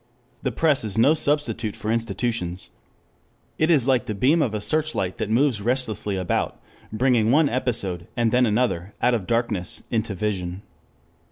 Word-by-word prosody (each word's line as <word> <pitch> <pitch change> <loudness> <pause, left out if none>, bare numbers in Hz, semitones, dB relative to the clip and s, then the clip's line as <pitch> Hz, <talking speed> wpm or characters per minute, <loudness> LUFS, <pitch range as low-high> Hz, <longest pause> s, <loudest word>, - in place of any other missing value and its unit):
The 130 - -1
press 145 +2 +2
is 105 -1 -3
no 130 +7 +5
substitute 145 -8 -1
for 105 +2 -3
institutions. 110 -5 -2 0.9
It 155 - +2
is 140 -7 +4
like 130 -2 +2
the 110 - -3
beam 145 +10 +3
of 115 -7 0
a - - -1
searchlight 150 - -1
that 105 - -2
moves 120 -1 +2
restlessly 110 -4 -1
about, 90 -2 -1 0.3
bringing 115 -1 +2
one 150 +4 +4
episode 105 -9 -2
and 115 -2 +2
then 125 0 +3
another 105 -4 -1
out 125 +1 +2
of 110 -6 -2
darkness 115 -8 -1
into 110 -3 -1
vision. 95 -1 -3
115 Hz, 160 wpm, -23 LUFS, 100-130 Hz, 0.9 s, no